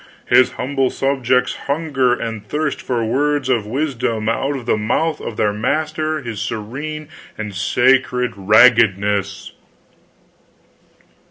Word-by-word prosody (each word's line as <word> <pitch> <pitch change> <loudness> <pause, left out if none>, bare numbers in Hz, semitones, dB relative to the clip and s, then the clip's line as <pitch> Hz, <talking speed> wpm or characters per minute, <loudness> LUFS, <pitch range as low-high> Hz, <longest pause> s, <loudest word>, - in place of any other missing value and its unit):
his 130 - +4
humble 135 0 -1
subjects 130 -2 0
hunger 140 -4 +1
and 115 -3 -3
thirst 150 +1 -2
for 120 -3 -2
words 140 +3 0
of 115 -5 +1
wisdom 115 -4 -2
out 135 +5 0
of 130 -3 -6
the 120 - +2
mouth 135 +9 -1
of 110 - -6
their 105 -1 +1
master 155 +7 -1
his 110 -4 -5
Serene 135 +9 -5 0.3
and 105 -2 -5
Sacred 125 +4 +2
Raggedness!" 100 -2 +3
125 Hz, 115 wpm, -19 LUFS, 110-140 Hz, 0.3 s, his